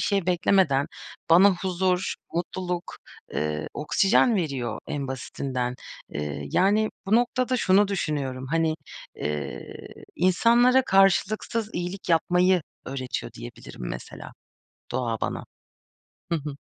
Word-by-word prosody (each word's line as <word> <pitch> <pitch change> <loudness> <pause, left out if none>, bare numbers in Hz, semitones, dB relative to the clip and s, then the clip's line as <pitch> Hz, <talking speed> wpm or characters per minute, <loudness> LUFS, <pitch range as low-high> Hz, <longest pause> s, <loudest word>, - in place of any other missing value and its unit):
şey 195 -4 0
beklemeden 175 -5 +3 0.4
bana 190 +4 +7
huzur, 185 0 0 0.2
mutluluk, 180 0 -3 0.4
ııı, 75 0 -2
oksijen 195 - +3
veriyor 135 - -2
en 140 -2 -3
basitinden. 130 -1 -3 0.4
Eee, 75 0 -4
yani, 210 +3 +3 0.2
bu 200 - +3
noktada 250 +1 +1
şunu 200 -3 +4
düşünüyorum. 140 -9 -2
Hani, 160 +2 +1 0.4
eee, 75 0 -4 0.4
insanlara 235 +8 +4
karşılıksız 195 +3 +2
iyilik 180 +2 -4
yapmayı 180 +2 +3 0.2
öğretiyor 130 -1 -4
diyebilirim, - - -9
mesela, - - -8 0.6
doğa 120 -3 -2
bana. - - -3 0.9
Hı - - +3
hı. 150 -2 -5
175 Hz, 105 wpm, -25 LUFS, 130-195 Hz, 0.9 s, bana